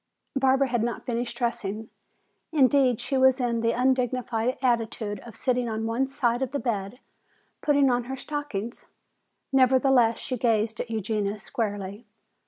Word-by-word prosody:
Barbara 270 0 +3
had 240 -2 0
not 235 +1 -3
finished 240 -1 -3
dressing. 220 -3 -3 0.6
Indeed, 270 -5 +4
she 270 - -1
was 260 0 +5
in 235 -2 0
the 230 0 +2
undignified 250 -1 0
attitude 225 -4 -1
of 230 +1 -12
sitting 250 -2 0
on 220 0 -2
one 235 +4 0
side 245 -2 0
of 265 0 -2
the 285 - 0
bed 215 -3 -3 0.6
putting 285 -3 +3
on 245 -1 0
her 265 +2 -5
stockings. 260 -7 -5 0.7
Nevertheless, 255 -3 +4
she 255 - -4
gazed 225 -1 +1
at 245 - -4
Eugenia 215 -1 -1
squarely. 205 0 -4
240 Hz, 145 wpm, -26 LUFS, 225-260 Hz, 0.7 s, was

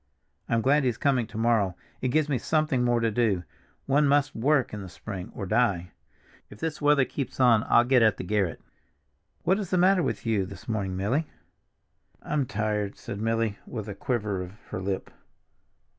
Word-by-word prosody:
I'm 115 0 +2
glad 145 +2 +4
he's 125 -4 0
coming 130 -4 +1
to 110 - -9
morrow, 110 -5 +2 0.3
it 130 - 0
gives 150 +4 +2
me 140 -4 0
something 155 -3 +1
more 120 -1 +2
to 115 -1 +1
do; 105 -5 +1 0.4
one 145 +2 +3
must 145 0 +3
work 135 +1 +2
in 105 - -5
the 95 - -8
spring, 95 0 -7
or 100 - -4
die. 95 -4 +1 0.6
If 105 - -13
this 160 -2 -3
weather 145 -2 +4
keeps 135 0 -5
on 120 -4 +5
I'll 120 - +6
get 125 0 +4
at 110 -3 +4
the - - -5
garret. 95 -2 0 0.8
What 190 +3 +2
is 195 -5 -4
the 185 - +1
matter 185 +1 +4
with 120 -8 -2
you 105 -5 +1
this 95 -1 -11
morning, 100 -4 -2
Milly?" 130 +11 0 1.0
"I'm 145 -4 -1
tired," 105 -2 -2
said 100 - -6
Milly 115 -2 0
with 110 -3 -5
a 105 - -4
quiver 105 -7 -2
of 90 0 -7 0.2
her 95 - -4
lip. 95 0 -3
115 Hz, 190 wpm, -27 LUFS, 100-140 Hz, 1.0 s, I'll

